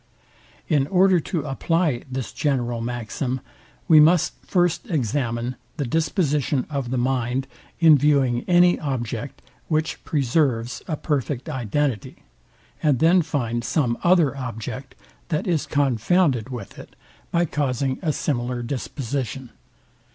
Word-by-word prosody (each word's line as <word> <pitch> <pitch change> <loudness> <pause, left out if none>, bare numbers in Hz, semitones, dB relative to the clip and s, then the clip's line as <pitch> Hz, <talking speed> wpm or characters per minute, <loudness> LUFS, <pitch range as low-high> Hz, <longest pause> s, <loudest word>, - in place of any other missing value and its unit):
In 140 -3 +2
order 185 +1 +4
to 160 0 -3
apply 150 -1 0
this 130 -5 -4
general 120 -5 -1
maxim, 120 +2 -3 0.5
we 155 -2 +8
must 160 +2 +5
first 175 -3 0
examine 125 - -1 0.2
the 145 - -1
disposition 150 - 0
of 140 -4 -2
the 130 - -1
mind 125 +1 0 0.3
in 160 -4 +7
viewing 135 -4 +2
any 175 0 +5
object 130 -3 -4 0.2
which 155 0 -1
preserves 130 -4 0
a 155 -4 -2
perfect 140 -2 -2
identity, 130 -3 -2 0.6
and 150 -4 +3
then 170 +6 +5
find 120 -7 -2
some 120 -3 +1
other 170 -6 +4
object, 125 0 -6 0.3
that 155 -3 -1
is 170 -5 0
confounded 135 - +2
with 125 -2 -8
it, - - -13 0.3
by 170 0 +2
causing 135 -3 -1
a 160 -4 +1
similar 125 -4 -2
disposition. 130 -1 -4
135 Hz, 120 wpm, -23 LUFS, 120-155 Hz, 0.6 s, we